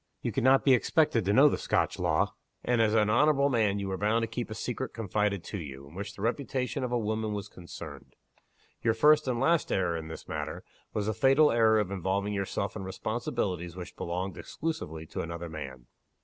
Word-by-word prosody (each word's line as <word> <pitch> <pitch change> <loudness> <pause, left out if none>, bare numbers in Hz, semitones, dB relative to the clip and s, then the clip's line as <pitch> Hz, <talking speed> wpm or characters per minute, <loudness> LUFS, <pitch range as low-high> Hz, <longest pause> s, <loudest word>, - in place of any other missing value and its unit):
You - - -1
could - - -1
not 135 +1 +5
be 135 - +7
expected 125 - +2
to 100 - +2
know 135 +6 +7
the - - +1
Scotch - - 0
law. - - +1 0.3
And, 120 -2 +3
as 110 0 +3
an 105 -1 +3
honorable 140 +3 +4
man, 110 -6 +2
you 100 -1 -3
were 95 -1 -3
bound 110 +3 +2
to - - 0
keep 115 0 -4
a 110 - -5
secret 125 +3 -4
confided 105 -3 -1
to 100 - -5
you, 70 -4 -8
in 70 - -15
which 100 +3 -6
the 100 - -7
reputation 125 +2 -1
of 125 - -2
a 120 - +2
woman 110 -1 -1
was 100 -1 -4
concerned. 70 -6 -10 0.7
Your 115 -1 +2
first 150 +4 +5
and 125 -2 0
last 165 +5 +2
error 90 -3 +1
in 80 -1 -5
this 80 - -9
matter, - - -4 0.3
was 105 - -2
the 110 - 0
fatal 135 +7 +5
error 110 -1 +4
of 100 -2 -1
involving 100 +2 -1
yourself 100 0 -2
in 105 - -5
responsibilities 95 -4 -3
which 90 -1 -8
belonged 90 +2 -3
exclusively 80 - -4
to 80 - -5
another 85 +1 -5
man." 65 -6 -7
105 Hz, 210 wpm, -29 LUFS, 90-120 Hz, 0.7 s, be